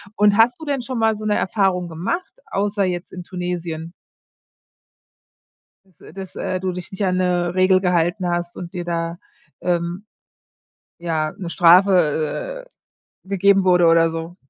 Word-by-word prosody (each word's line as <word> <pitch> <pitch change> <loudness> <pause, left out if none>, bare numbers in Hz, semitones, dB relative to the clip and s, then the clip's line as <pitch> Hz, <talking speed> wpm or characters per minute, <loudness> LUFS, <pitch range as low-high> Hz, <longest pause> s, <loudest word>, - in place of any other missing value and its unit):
Und 205 0 +4
hast 245 +4 +4
du 315 - -8
denn 280 -3 -1
schon 250 0 -5
mal 225 -1 +2
so 215 +1 -7
'ne 210 -1 +1
Erfahrung 185 -3 0
gemacht, 180 - -4
außer 200 0 -1
jetzt 175 -1 -4
in 180 -1 -7
Tunesien? 175 -3 -5 1.9
Dass 185 -5 -31
äh, - - -14
dass, 190 -1 -9
äh, 185 -1 -2
du 185 -1 -2
dich 180 0 -7
nicht 195 +1 -2
an 185 -1 +1
'ne 180 -1 0
Regel 185 0 +4
gehalten 180 0 +1
hast 175 0 -2
und 175 0 -7
dir 175 -2 -5
da, 170 0 -3 0.4
ähm, 175 +3 -2 0.9
ja, 160 -3 -2
'ne 180 -4 -5
Strafe, 180 - +3 0.4
äh, - - -29
gegeben 195 0 +3
wurde 180 -2 +4
oder 165 0 +5
so. 165 +2 -6
180 Hz, 155 wpm, -21 LUFS, 170-195 Hz, 1.9 s, oder